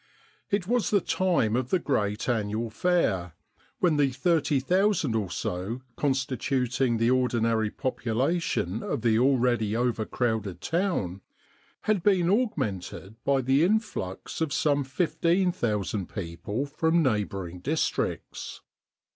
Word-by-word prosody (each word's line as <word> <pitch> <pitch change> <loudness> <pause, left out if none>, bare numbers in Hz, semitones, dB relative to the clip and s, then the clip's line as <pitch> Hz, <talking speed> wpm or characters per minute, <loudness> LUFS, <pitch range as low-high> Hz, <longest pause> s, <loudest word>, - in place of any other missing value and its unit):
It 200 -2 0
was 240 0 +1
the 205 - +4
time 170 - +1
of 125 0 -1
the 185 - +3
great 105 - -1
annual 110 -1 -1
fair, 105 - +1 0.4
when 170 -5 +2
the 140 -2 +3
30,000 160 - +1
or 105 -4 -1
so 95 +10 -3
constituting 130 -2 0
the 115 +2 +2
ordinary 115 -4 +2
popu 130 +3 -4
lation 125 - 0
of 115 - -3
the 115 -1 +3
already 120 -4 +2
overcrowded 110 -4 -1
town 165 - -1 0.6
had 215 -4 +1
been 185 -2 +3
augmented 110 - -2
by 140 -1 +2
the 135 +4 +3
influx 185 - -1
of 160 -3 0
some 145 0 +2
15,000 150 - 0
people 95 - -4
from 160 +3 +1
neighbouring 100 - -1
districts. 150 - -2
130 Hz, 115 wpm, -27 LUFS, 110-165 Hz, 0.6 s, the